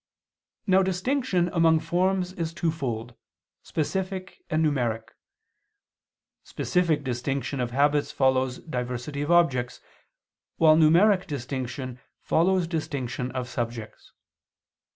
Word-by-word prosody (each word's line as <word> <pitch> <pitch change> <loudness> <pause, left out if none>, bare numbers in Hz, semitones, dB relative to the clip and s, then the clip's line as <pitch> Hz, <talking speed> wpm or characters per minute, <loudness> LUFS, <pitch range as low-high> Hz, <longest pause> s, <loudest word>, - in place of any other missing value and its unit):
Now 190 -1 +4
distinction 190 0 0
among 165 -2 +4
forms 180 +3 0
is 165 -2 -4
twofold: 130 -9 -2 0.5
specific 185 +4 -3
and 155 +1 +2
numeric. 120 -6 -1 1.3
Specific 165 -5 0
distinction 135 +2 -2
of 125 -1 -1
habits 145 +3 +2
follows 130 -1 +1
diversity 125 0 -4
of 145 - -3
objects, 135 -8 +2 0.8
while 155 -1 +6
numeric 180 +5 +5
distinction 130 -2 -5 0.2
follows 180 +2 +2
distinction 140 -6 -3
of 130 -1 -3
subjects. 115 -3 -6
150 Hz, 95 wpm, -26 LUFS, 125-175 Hz, 1.3 s, while